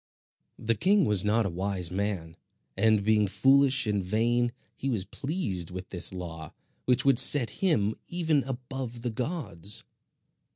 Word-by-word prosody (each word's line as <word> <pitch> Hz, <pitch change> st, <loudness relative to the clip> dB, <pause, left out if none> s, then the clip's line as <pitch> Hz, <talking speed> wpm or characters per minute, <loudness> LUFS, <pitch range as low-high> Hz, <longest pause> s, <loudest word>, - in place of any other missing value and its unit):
The 115 Hz, -, 0 dB
king 190 Hz, -, +2 dB
was 105 Hz, -5 st, +3 dB
not 110 Hz, +2 st, +1 dB
a -, -, -1 dB
wise 90 Hz, -1 st, -3 dB
man; 95 Hz, -4 st, -3 dB, 0.4 s
and 110 Hz, +1 st, +2 dB
being 105 Hz, -1 st, +2 dB
foolish 135 Hz, +4 st, +3 dB
and 100 Hz, -2 st, -1 dB
vain, 120 Hz, +5 st, 0 dB, 0.2 s
he 135 Hz, -, -4 dB
was 105 Hz, -7 st, -1 dB
pleased 105 Hz, -, -3 dB
with 90 Hz, 0 st, -8 dB
this 90 Hz, -, +1 dB
law 85 Hz, -4 st, -8 dB, 0.3 s
which 125 Hz, +1 st, +1 dB
would 135 Hz, -3 st, +5 dB
set 125 Hz, -7 st, +6 dB
him 110 Hz, -, +2 dB
even 160 Hz, -5 st, 0 dB
above 125 Hz, -2 st, -6 dB
the 120 Hz, -, -2 dB
gods. 120 Hz, -, -3 dB
110 Hz, 150 wpm, -27 LUFS, 95-135 Hz, 0.4 s, set